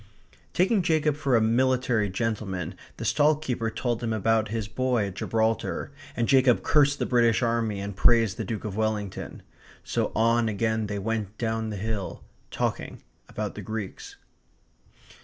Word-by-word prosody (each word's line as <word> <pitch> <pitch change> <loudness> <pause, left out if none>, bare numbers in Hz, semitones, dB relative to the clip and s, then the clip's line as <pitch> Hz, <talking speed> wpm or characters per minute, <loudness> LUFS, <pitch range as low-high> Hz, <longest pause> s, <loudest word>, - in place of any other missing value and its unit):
Taking 190 +3 +3
Jacob 155 -3 +2
for 140 -4 +1
a 115 - +4
military 120 -1 +2
gentleman, 95 -4 -2 0.2
the - - -5
stall 150 +1 +4
keeper 125 -6 -2
told 115 +1 -2
him 115 -2 -1
about 110 +1 +2
his 110 -1 -3
boy 120 0 0
at 100 - -5
Gibraltar, 110 +6 -1 0.3
and 120 -1 +1
Jacob 130 -3 +4
cursed 145 -1 +4
the - - -1
British 120 -1 +3
army 115 -3 0
and 100 0 -5
praised 115 -2 +4
the 115 - -2
Duke 110 +1 -4
of 100 -2 -4
Wellington. 105 -3 -3 0.4
So - - -1
on 115 +1 +3
again 110 +1 0
they 100 0 -3
went 105 0 -3
down 115 -1 -1
the 105 - -4
hill 105 -1 -4 0.3
talking - - -3 0.3
about - - -4
the - - -7
Greeks. 110 -3 -6
115 Hz, 160 wpm, -26 LUFS, 105-125 Hz, 0.4 s, a